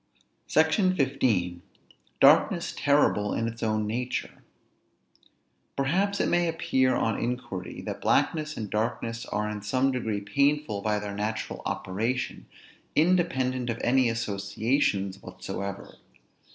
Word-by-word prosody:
SECTION 185 +4 +3
XV. 120 - +1 0.6
DARKNESS - - +5
TERRIBLE 140 -7 +2
IN 115 - 0
ITS 115 0 -6
OWN 110 -1 0
NATURE. 125 +4 -3 1.3
Perhaps 190 +9 +1
it - - +2
may 175 0 +2
appear 130 -5 +1
on 115 - 0
inquiry, 120 -6 -4
that - - -5
blackness 155 -1 +1
and 110 - -3
darkness 115 +2 -2
are 105 0 -1
in 105 -1 -4
some 130 +6 +1
degree 110 -5 -2
painful 140 0 +1
by 105 0 0
their 105 -1 -4
natural 105 +1 -3
operation, 115 +8 -2 0.5
independent 130 -7 +2
of 115 - -1
any 130 0 +3
associations 100 -1 -1
whatsoever. 95 +2 -6
115 Hz, 115 wpm, -27 LUFS, 105-135 Hz, 1.3 s, DARKNESS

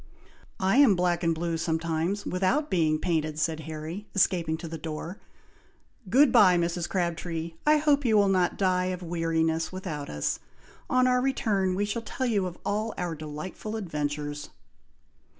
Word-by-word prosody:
"I 190 +5 +2
am 270 -8 +7
black 175 -1 +1
and 165 -2 +1
blue 165 0 -2
sometimes, 165 +4 -1
without 215 +12 0
being 160 -4 +2
painted," 155 -2 -1
said 155 0 0
Harry, 160 +6 -6
escaping 170 -5 +2
to 165 - -7
the 165 0 -6
door. 160 +4 -6 0.9
"Good 265 +3 +5
bye, 200 -7 +6
Mrs. 170 0 -1
Crabtree! 170 -2 -2
I 305 0 +6
hope 295 -1 +3
you 225 -4 +3
will 200 -1 +5
not 185 -2 +2
die 185 -2 +2
of 185 0 -3
weariness 165 -1 0
without 170 -6 -5
us! 75 0 -2 0.5
On 255 0 +3
our 250 0 +3
return 205 -8 +1
we 205 +2 0
shall 210 +3 -3
tell 255 +4 -4
you 205 -6 +1 0.2
all 215 +2 -1
our 175 -2 -2
delightful 155 +8 -6
adventures." 150 -6 -3
175 Hz, 155 wpm, -27 LUFS, 160-205 Hz, 0.9 s, am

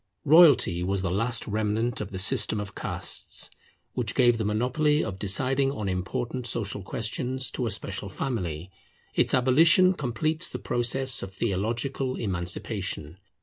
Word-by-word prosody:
Royalty 150 - +6
was 95 +1 -1
the 90 - -1
last 115 +4 -1
remnant 110 +2 -1
of 100 - -5
the 95 - -6
system 100 +3 +3
of 100 -1 -6
castes, - - -3 0.4
which - - -2
gave 120 -1 +4
the - - 0
monopoly 125 +8 +1
of 95 - -5
deciding 130 +7 +1
on 110 -7 -4
important 120 +7 -3
social 105 -3 -3
questions 125 +6 -3
to 125 - -2
a - - -1
special 100 -1 -3
family; 95 - -4 0.4
its - - +3
abolition 160 +8 +5
completes 155 +3 -2
the - - -5
process 125 +1 +2
of 95 - -6
theological 120 +7 -2
emancipation. 90 -3 -4
115 Hz, 145 wpm, -26 LUFS, 95-130 Hz, 0.4 s, Royalty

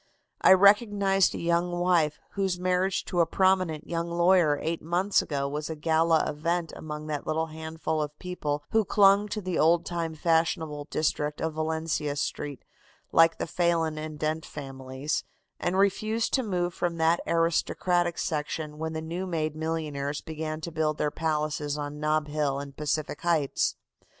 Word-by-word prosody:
I - - +8
recognized 200 -1 +4
a - - -4
young 170 +1 +1
wife, 175 -4 +2
whose 190 -3 -1
marriage 185 +1 0
to 175 - -2
a 170 - +4
prominent 185 -5 +1
young 170 0 -3
lawyer 170 -3 +4
eight 165 +1 -2
months 180 +5 +2
ago 140 -2 -2
was 150 +2 -4
a 160 - -3
gala 160 +1 +2
event 165 +3 -2
among 150 -1 -6
that 150 -2 -4
little 160 +1 0
handful 160 0 -3
of 150 0 -4
people 150 -5 -3
who 220 -1 +3
clung 200 +1 +5
to 210 +1 -4
the 185 -3 -2
old 165 +2 +4
time 165 -2 -3
fashionable 160 -2 0
district 150 -1 -1
of 160 0 -2
Valencia 160 -2 -1
Street, 145 -1 -4 0.5
like 165 0 +5
the - - -2
Phelan 165 -2 0
and 155 0 -6
Dent 155 +1 -1
families, 135 0 -4 0.4
and 180 +2 0
refused 215 +3 +1
to 265 - +3
move 180 -6 -1
from 170 -1 -2
that 165 +1 +3
aristocratic 170 +1 +1
section 150 0 -3
when 160 0 -3
the 160 - -3
new 175 +4 -4
made, 155 -3 -2
millionaires 150 -3 -3
began 155 0 -5
to 170 - -5
build 155 -1 0
their 150 - 0
palaces 150 -2 -1
on 145 0 -5
Nob 155 0 +1
Hill 145 -2 -1
and 140 -1 -8
Pacific 150 -1 -2
Heights. 165 -5 +1
160 Hz, 165 wpm, -27 LUFS, 150-175 Hz, 0.5 s, I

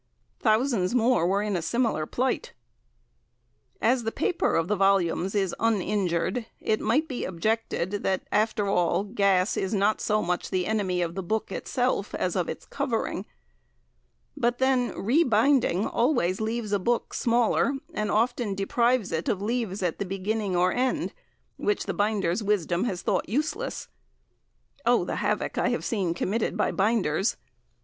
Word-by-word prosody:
Thousands 225 -2 +2
more 240 -7 +3
were 200 +2 +1
in 210 -2 -1
a 175 - 0
similar 220 -3 0
plight. 255 +1 -1 1.3
As 245 +2 +2
the 225 - -1
paper 340 +6 0
of 165 0 +1
the 210 - +1
volumes 195 -1 +2
is 195 -3 +1
uninjured, 210 0 0
it 215 - 0
might 300 +7 +1
be 255 -4 -4
objected 185 0 -1
that, 190 -1 0
after 215 -1 +1
all, 180 0 +2
gas 200 -3 +2
is 195 +3 -1
not 205 +2 +2
so 215 0 +1
much 175 0 -2
the 185 -2 0
enemy 190 -5 0
of 170 -1 -3
the 190 - -3
book 215 +5 -2
itself - - -1
as - - -1
of - - 0
its - - -6
covering; 260 -6 -2 1.1
but 240 +1 0
then, 260 -2 +2
re 260 +12 +3
binding 225 - +3
always 230 - +1
leaves 220 -1 -2
a 205 - +2
book 235 +5 -1
smaller, 235 +3 +2 0.2
and 215 -1 -2
often 230 -1 +1
deprives 235 +2 +1
it 165 0 -1
of 190 - 0
leaves 210 -2 -2
at 175 -3 -1
the 200 - -1
beginning 195 +1 -2
or 180 +1 +3
end, 255 +1 0 0.4
which 415 - 0
the - - -2
binder's 205 -2 0
wisdom 195 -2 0
has 190 -6 -3
thought 190 - 0
useless. 310 - -2 1.0
Oh! - - +3
the - - -3
havoc - - -1
I - - +2
have - - -2
seen 190 -7 -1
committed 215 +5 -1
by 210 - +1
binders. 195 -3 +1
210 Hz, 155 wpm, -26 LUFS, 185-235 Hz, 1.3 s, more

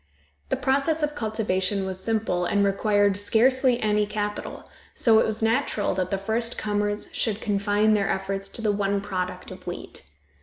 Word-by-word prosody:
The - - +1
process 280 +4 0
of 300 0 0
cultivation 205 -5 -1
was 190 -1 -5
simple, 220 -5 0
and 200 +2 +2
required 205 0 +2
scarcely 245 +4 +3
any 210 -1 +1
capital, 210 0 -4 0.3
so 225 -2 +5
it - - +2
was 220 0 -3
natural 225 -2 +1
that 185 0 -2
the 195 - 0
first 225 +4 0
comers 205 0 -1
should 215 -3 -1
confine 205 +1 +1
their 205 -2 +1
efforts 195 +1 -2
to 225 - -5
the 215 - +2
one 200 0 0
product 185 -2 -4
of - - -12
wheat. - - -7
210 Hz, 165 wpm, -25 LUFS, 195-225 Hz, 0.3 s, so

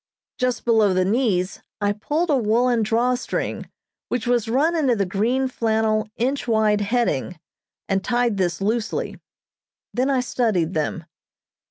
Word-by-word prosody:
Just 250 -1 -1
below 220 -5 +3
the 185 0 +2
knees 195 -4 0 0.2
I 205 -1 +1
pulled 300 +11 -1
a - - +4
woolen 240 0 +2
drawstring 240 +4 -1 0.4
which 245 -1 -2
was 240 -2 +1
run 290 +9 +2
into 275 -7 +2
the 200 -2 0
green 230 +8 0
flannel, 220 -3 0
inch 260 +3 -1
wide 215 -2 +2
heading, 200 - 0 0.5
and 195 0 0
tied 240 -3 +1
this 175 -2 -1
loosely; 220 +2 -2 0.7
then 255 +3 +1
I 265 -2 +2
studied 215 -9 0
them. 160 +1 -2
225 Hz, 140 wpm, -22 LUFS, 205-250 Hz, 0.7 s, a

